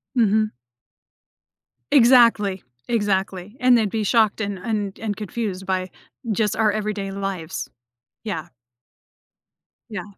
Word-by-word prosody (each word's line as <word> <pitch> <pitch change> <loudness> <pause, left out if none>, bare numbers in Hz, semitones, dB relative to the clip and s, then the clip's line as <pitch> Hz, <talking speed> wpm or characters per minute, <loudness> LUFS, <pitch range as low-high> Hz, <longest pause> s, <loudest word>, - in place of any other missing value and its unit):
Mhm. 215 -2 +3 1.4
Exactly. 230 -7 +5 0.2
Exactly. 195 -2 -1
And 250 -1 +5
they'd 220 -3 +1
be 220 +1 -2
shocked 220 0 +2
and 200 -2 -2
and 205 -1 -3
and 215 -2 -3
confused 205 -2 -4
by 185 0 -1 0.4
just 215 0 +1
our 215 -1 +3
everyday 210 -2 -3
lives. 195 -4 -4 0.5
Yeah. 185 -8 -4 1.4
Yeah. 205 -5 -5
210 Hz, 105 wpm, -22 LUFS, 195-220 Hz, 1.4 s, Exactly